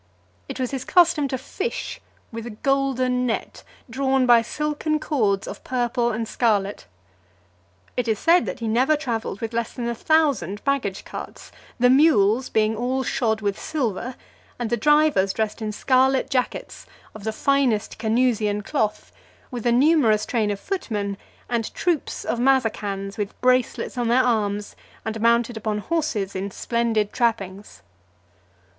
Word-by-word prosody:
It - - -6
was 255 -1 -1
his 270 -2 -3
custom 340 -4 +4
to 260 - -2
fish 385 - -5 0.3
with 230 0 -6
a 215 -3 -9
golden 255 -2 +1
net, 225 - -3 0.3
drawn 265 +1 +1
by 240 -2 +6
silken 300 +5 -2
cords 210 -11 0
of - - -8
purple 240 -1 0
and 225 0 -3
scarlet. 205 - 0 1.1
It 250 -1 -1
is 220 -2 +1
said, 340 - +3
that - - -5
he 230 - -2
never 255 +7 +3
travelled 230 -8 -3
with 225 0 -4
less 230 -1 -2
than 240 -2 -4
a 235 - -1
thousand 285 - +1
baggage 265 -9 -1
carts; - - -9 0.3
the 250 +1 +5
mules 260 -5 +4
being 220 0 +2
all 255 +4 -1
shod 220 -3 0
with 200 -1 -1
silver, 250 -5 -3 0.4
and 240 -2 -3
the - - +3
drivers 295 -6 +3
dressed 220 +1 -2
in 215 -1 -2
scarlet 260 +4 +2
jackets 255 -2 -2 0.3
of 215 - -10
the 220 - -1
finest 250 -4 +1
Canusian 220 -2 +1
cloth, 220 -5 -2 0.4
with 245 -2 -3
a - - +4
numerous 245 -5 +4
train 220 -4 0
of 200 -1 -2
footmen, 210 - -3 0.3
and 235 -2 -2
troops 340 -4 -1
of 235 - -1
Mazacans, 215 -6 0
with 205 -1 -4
bracelets 255 0 +1
on 240 - 0
their 250 +3 +4
arms, 210 -4 -1 0.3
and 220 0 -3
mounted 235 0 +2
upon 215 -1 -2
horses 225 - -2
in 195 +1 -3
splendid 225 0 -1
trappings. 205 -5 -2
235 Hz, 150 wpm, -23 LUFS, 215-265 Hz, 1.1 s, by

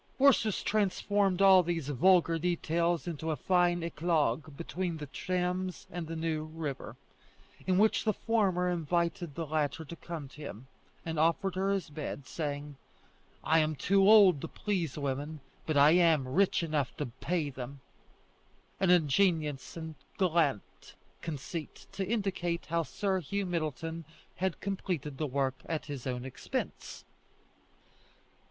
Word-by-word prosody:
Ursus 260 -6 +4
transformed 200 -2 +1
all 190 -1 +8
these 165 -4 -2
vulgar 165 +3 +4
details 170 0 0
into 160 -2 -4
a 155 - +1
fine 175 +3 +2
Eclogue 155 -3 0
between 170 0 -3
the 150 - -6
Thames 180 +4 -2
and 170 -2 -5
the 165 - -5
New 160 -1 -2
River, 155 -3 -5 0.7
in 185 -1 +3
which 215 +2 +3
the 220 - +3
former 195 -5 +1
invited 170 -1 -1
the 165 - -3
latter 155 0 -1
to 170 - -8
come 165 -4 -7
to 150 - -13
him, 125 -4 -8 0.4
and 160 -2 -2
offered 170 +4 +2
her 190 +1 0
his 195 -5 -2
bed, 145 -2 -5
saying, 145 -2 -4 0.7
"I 160 +1 +4
am 155 0 +1
too 195 +7 +2
old 195 -9 +7
to - - -4
please 180 -9 -2
women, 145 +2 -3 0.3
but 155 -2 +1
I 145 +2 +7
am 165 -6 +4
rich 180 +6 +2
enough 150 -5 -1
to - - -2
pay 145 +5 -2
them" 130 +2 -7 1.0
an 190 - +2
ingenious 160 -3 +2
and 160 -1 -6 0.2
gallant 165 - 0 0.3
conceit 160 +1 -6
to 195 - -3
indicate 190 -5 -1
how 165 +2 0
Sir 190 +3 -1
Hugh 200 +4 -2
Middleton 165 -1 -3 0.3
had 190 -1 -1
completed 175 -8 -3
the 155 - 0
work 135 -1 -1
at 160 -2 -2
his 140 -3 -6
own 125 0 -3
expense. 130 - -5
165 Hz, 145 wpm, -31 LUFS, 150-180 Hz, 1.0 s, all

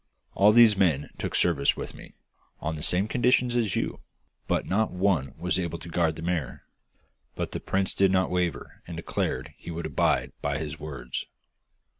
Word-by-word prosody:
all 100 +2 +6
those 115 -1 +7
men 80 -7 +2
took - - -3
service 75 -5 +3
with - - -6
me, - - -13 0.4
on 80 +1 -3
the 75 - -7
same 90 +5 +2
conditions 125 +1 +2
as 110 -6 +1
you, - - -2 0.5
but - - 0
not 110 +3 +1
one 90 -8 0
was 90 +1 0
able 85 -2 -2
to 85 - -10
guard 80 -2 +1
the 80 - -8
mare!' 85 -7 -2 0.7
But - - -3
the - - -3
prince 95 0 0
did 95 -1 +3
not 95 0 +2
waver, 90 -5 -2
and 85 -2 -6
declared 85 - -2
he - - -10
would 85 0 -4
abide 75 -3 +1
by 70 0 -1
his 75 -1 -5
words. 70 -5 -5
85 Hz, 180 wpm, -27 LUFS, 75-95 Hz, 0.7 s, those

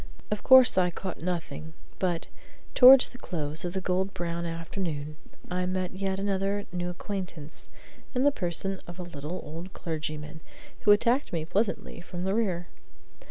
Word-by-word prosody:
Of 210 - -1
course 260 -6 +7
I 180 -1 +3
caught 185 +1 -6
nothing; 160 -2 -4 0.2
but, 175 -3 0 0.5
towards 260 +1 +9
the 245 - -13
close 155 -2 -3
of 175 -1 -3
the 190 - -2
gold 190 +2 -1
brown 170 0 -3
afternoon, 165 -3 -4 0.4
I 180 0 0
made 185 0 -3
yet 195 -1 -1
another 200 +1 -1
new 175 0 -2
acquaintance, 180 -4 -6 0.5
in 250 - +2
the 285 - +5
person 190 - -1
of 175 0 -9
a 180 - -5
little 170 +1 -6
old 165 +5 -8
clergyman 155 -2 -5 0.4
who 205 - +5
attacked 235 +6 +3
me 160 -2 -2
pleasantly 200 0 -1
from 175 0 -6
the 190 +1 0
rear. 185 -6 0
180 Hz, 160 wpm, -28 LUFS, 165-195 Hz, 0.5 s, towards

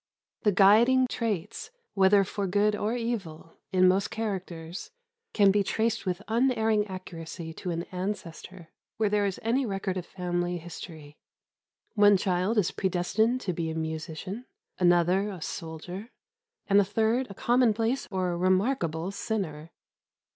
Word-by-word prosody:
The 210 - +3
guiding 220 +7 +5
traits 225 - -3 0.2
(whether 195 +1 +5
for 200 +1 -3
good 205 +3 +2
or 215 +3 -1
evil) 195 -10 -4
in 185 -1 +5
most 190 +2 +2
characters 185 -5 -5 0.4
can 200 -2 +5
be 205 +1 +2
traced 220 +1 -1
with 180 +2 -2
unerring 225 -2 +2
accuracy 165 -3 -7
to 180 - -6
an 170 0 -2
ancestor, 180 -2 -6 0.3
where 215 -1 +2
there 205 -1 +2
is 190 - -4
any 240 +5 +1
record 195 -4 -2
of 180 - -5
family 175 -1 -2
history. 160 -3 -10 0.7
One 205 -2 +6
child 185 +3 0
is 200 -5 +2
predestined 215 +6 0
to 185 - -2
be 165 -1 -2
a 160 - -4
musician, 160 +8 -5 0.3
another 180 +3 +3
a 190 -3 -7
soldier, 170 +7 -6 0.6
and 200 0 +5
a - - +3
third 225 +6 +1
a 200 - -9
commonplace 235 +1 +2
or 185 -3 -1
remarkable 185 - +1
sinner. 175 -7 -4
195 Hz, 140 wpm, -28 LUFS, 175-220 Hz, 0.7 s, One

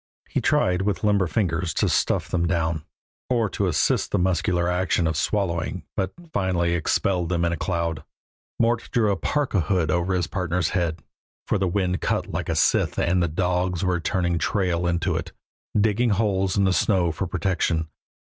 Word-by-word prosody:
He - - -1
tried 90 0 +2
with 100 +1 -1
limber 100 -3 +3
fingers 90 -3 -1
to - - +2
stuff - - +1
them 85 -1 0
down, 80 -3 0 0.5
or 120 -3 +2
to 100 - 0
assist 85 - +1
the - - 0
muscular 90 -1 +1
action 90 -1 +1
of 80 0 0
swallowing, 90 0 -1
but 95 -2 -1 0.2
finally 90 -3 +1
expelled 85 +1 0
them 85 -1 +1
in 85 - +1
a - - 0
cloud. 85 -2 -2 0.6
Mort 115 0 +1
drew 110 -3 +2
the 100 - +2
parka 130 - 0
hood 85 -1 +1
over 90 +3 +1
his 90 -2 +1
partner's 90 -2 -1
head, 85 -4 -1 0.4
for 105 - 0
the 95 - +1
wind 90 0 0
cut - - 0
like - - -4
a - - 0
scythe - - +2
and 90 +1 +2
the 85 - +2
dogs 90 +2 0
were 90 -1 +1
turning 85 -1 0
tail 90 -4 0
to 85 0 -1
it, 80 - -6 0.5
digging 110 +3 +2
holes 95 -2 +1
in 100 - +3
the 95 -1 +3
snow 95 -5 +2
for 95 +3 -3
protection. 85 -3 0
90 Hz, 180 wpm, -24 LUFS, 85-95 Hz, 0.6 s, limber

